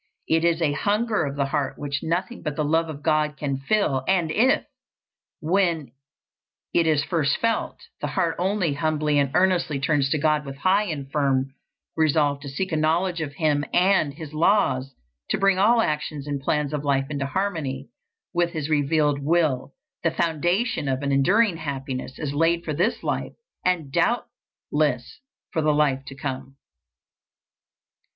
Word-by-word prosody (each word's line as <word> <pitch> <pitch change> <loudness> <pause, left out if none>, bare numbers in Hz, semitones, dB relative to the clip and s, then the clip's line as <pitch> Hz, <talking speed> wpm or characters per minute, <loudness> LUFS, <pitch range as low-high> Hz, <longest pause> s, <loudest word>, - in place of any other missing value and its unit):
It 160 0 +2
is 170 0 +2
a 150 - +2
hunger 210 +4 0
of 140 0 -4
the 140 -1 0
heart 140 -1 -2
which 140 -1 -3
nothing 180 +9 -2
but 150 -3 -3
the 150 - -1
love 165 +2 +1
of 145 -2 -8
God 155 -1 +1
can 140 -3 -2
fill, 135 -4 +1
and 175 -4 +2
if, 245 +10 +3 0.8
when 170 -3 +1 0.8
it 170 -1 +3
is 150 -2 +3
first 150 -3 0
felt, 230 -1 -1 0.2
the - - -2
heart 175 -4 0
only 185 -4 +1
humbly 150 -1 +1
and 140 -1 +2
earnestly 180 -5 +2
turns 140 0 +1
to 155 - +1
God 150 0 +2
with 135 -1 -7
high 190 +8 +2
and 140 -7 -5
firm 135 -3 +1 0.4
resolve 150 -2 +2
to 140 -1 -8
seek 185 +7 -3
a - - 0
knowledge 165 +3 +1
of 145 -2 -4
Him 145 -1 +1
and 180 -6 +3
His 155 -1 -9
laws, 155 -6 +2 0.3
to - - +1
bring 195 -1 +3
all 225 +4 +5
actions 150 -4 -2
and 145 -2 -3
plans 150 +1 0
of 150 -1 -2
life 135 -2 +1
into 140 -2 -2
harmony 150 -7 -3 0.4
with 175 -1 +1
His 155 -1 -3
revealed 150 -1 +2
will, 150 -4 +1 0.3
the 165 - +2
foundation 170 - 0
of 135 +1 -1
an 140 - 0
enduring 185 +8 +3
happiness 135 -3 -5
is 145 -3 -3
laid 165 +3 +1
for 155 - -2
this 185 +10 0
life, - - -2 0.3
and 170 -6 0
doubtless 145 - -1 0.3
for 160 - +1
the 150 -1 +2
life 140 -3 +2
to 135 - -9
come. 135 -1 -6
155 Hz, 165 wpm, -24 LUFS, 140-170 Hz, 0.8 s, all